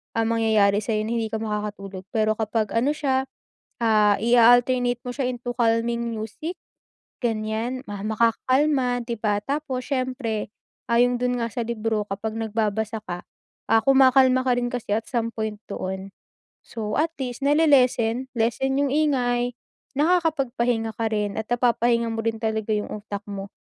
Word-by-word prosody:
ang 225 0 +1
mangyayari 215 -3 +3
sa'yo 215 0 -1
na 220 - -3
hindi 225 - -1
ka 220 0 -3
makakatulog 205 -3 -5
pero 215 -1 +2
kapag 220 -1 -1
ano 265 +6 +1
siya, 265 -3 0 0.6
ah, 215 -2 +4
i-a-alternate 245 +1 +4
mo 250 - -5
siya 270 0 -2
into 245 -1 -4
calming 235 0 +1
music, 225 - -5 0.7
ganyan, 225 +2 -1
ma 205 -1 -6
makakakalma, 250 +4 +2
'di 235 - -2
ba? 210 -2 +1
Tapos 275 -3 -3
siyempre 255 -6 -2 0.4
ayon 245 +1 +4
dun 250 0 +1
nga 230 - 0
sa 240 - -2
libro 225 -2 -1
kapag 215 +2 -3
nagbabasa 220 0 -1
ka, 175 -2 -5 0.5
ah, 225 - +6
kumakalma 260 -1 +5
ka 245 -1 +3
rin 245 - 0
kasi 245 -4 -5
at 220 0 -2
some 230 -2 -1
point 220 -1 -4
doon. 190 0 -4 0.6
So, 215 -2 -4
at 320 +2 +1
least 255 +2 -4
na-le-lessen, 260 -5 +3
lessen 240 +4 0
yung 285 - +2
ingay, 250 -4 +1 0.4
nakakapagpahinga 270 - +1
ka 225 - -1
rin 210 -1 -1
at 220 - -2
napapahinga 235 -1 +2
mo 225 0 -3
rin 225 0 -1
talaga 220 -1 -1
yung 210 0 -2
utak 205 -1 -6
mo. 195 0 -6
230 Hz, 150 wpm, -24 LUFS, 220-255 Hz, 0.7 s, ah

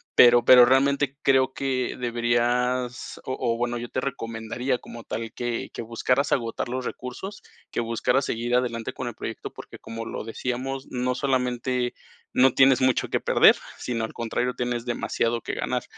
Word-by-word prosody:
pero 120 -1 +7
pero 125 -1 +9
realmente 140 +2 +2
creo 135 -1 +3
que 130 -2 -1
deberías 120 +1 0
o 130 - -2
o, 115 -2 0
bueno, 120 0 -1
yo 120 0 -6
te 130 - -2
recomendaría 120 0 -3
como 115 0 -10
tal 115 0 -5
que 120 -1 -3
que - - -5
buscaras 125 +5 0
agotar 115 0 -1
los 130 +1 -3
recursos, 190 +11 -6 0.3
que - - -2
buscaras 120 +3 +1
seguir 120 0 -1
adelante 120 -2 -1
con 125 - -5
el 120 - -10
proyecto, - - -6
porque, - - -11
como 115 0 -7
lo 115 - -5
decíamos, 130 +3 -4
no 125 0 0
solamente 125 -2 0 0.4
no 130 +1 +5
tienes 135 -1 +5
mucho 130 -2 +2
que - - +1
perder, - - +5 0.2
sino, 115 -2 -2
al - - -9
contrario, 120 +2 -2
tienes 120 -1 -2
demasiado 120 -1 -1
que - - -5
ganar. - - -2
125 Hz, 170 wpm, -25 LUFS, 120-130 Hz, 0.4 s, pero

